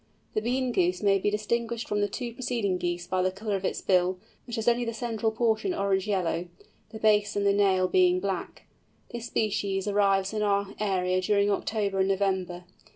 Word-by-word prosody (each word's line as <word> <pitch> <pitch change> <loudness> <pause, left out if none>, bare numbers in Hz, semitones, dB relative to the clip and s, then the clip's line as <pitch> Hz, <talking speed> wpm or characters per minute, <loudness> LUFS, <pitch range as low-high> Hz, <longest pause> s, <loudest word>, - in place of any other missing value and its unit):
The 215 - 0
Bean 250 +2 0
Goose 180 -2 +1
may 195 -1 +4
be 205 - +1
distinguished 230 +3 -2
from 205 0 0
the 205 - +2
two 235 +3 -5
preceding 230 -7 -1
Geese 175 0 -2
by 185 +1 0
the 185 - +2
colour 205 +2 -3
of 195 - -4
its - - -2
bill, 185 -1 +2 0.3
which 235 - -4
has 225 0 -3
only 240 0 +3
the 230 -1 -3
central 225 -1 -1
portion 230 - 0
orange 195 - 0
yellow, 180 -3 -1 0.4
the 220 - -8
base 210 -1 +2
and 205 0 0
the 200 - +4
nail 190 -2 +3
being 180 0 +3
black. 190 -1 -4 0.5
This 240 -1 -5
species 200 -4 -1
arrives 195 -1 +2
in 215 - -1
our 200 -1 0
area 185 -3 +1
during 200 +2 +2
October 200 -1 -1
and 190 - +3
November. 190 -2 -1
200 Hz, 195 wpm, -27 LUFS, 185-220 Hz, 0.5 s, may